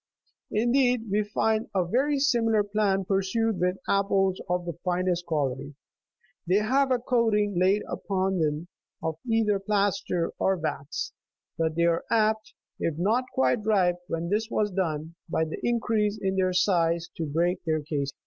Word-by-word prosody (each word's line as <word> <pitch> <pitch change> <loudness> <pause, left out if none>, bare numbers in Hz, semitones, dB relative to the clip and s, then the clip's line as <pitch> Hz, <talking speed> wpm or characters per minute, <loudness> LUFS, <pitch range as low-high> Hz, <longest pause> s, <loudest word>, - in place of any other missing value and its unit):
Indeed, 240 0 +2
we 210 +1 +2
find 220 +1 0
a 185 -2 +2
very 270 +10 +1
similar 235 -6 +2
plan 200 -2 0
pursued 195 +2 0
with 180 +1 +1
apples 195 -1 +2
of 180 0 0
the 170 - -3
finest 180 -1 0
quality; 140 -3 -2 0.7
they 180 - +3
have 265 +7 +2
a 255 - +3
coating 225 -5 +1
laid 190 +3 +3
upon 190 -1 -1
them 155 +1 -1 0.4
of 160 -1 -2
either 220 -3 +2
plaster 195 -4 0
or 190 0 +2
wax; 150 -3 -4 0.4
but 160 -1 -1
they 170 - +2
are 170 -1 +2
apt, 220 -1 +1 0.2
if 160 -2 -1
not 220 +9 +1
quite 130 +9 +2
ripe 185 -5 +2
when 165 0 -3
this 215 +3 0
was 210 -2 0
done, 165 -4 -2 0.2
by 160 0 +1
the 155 - -6
increase 220 -3 0
in 190 0 -1
their 185 -1 +2
size 170 -2 +2
to 165 - -2
break 170 +5 0
their 155 -2 0
casing." 140 -2 -3
190 Hz, 160 wpm, -27 LUFS, 170-215 Hz, 0.7 s, they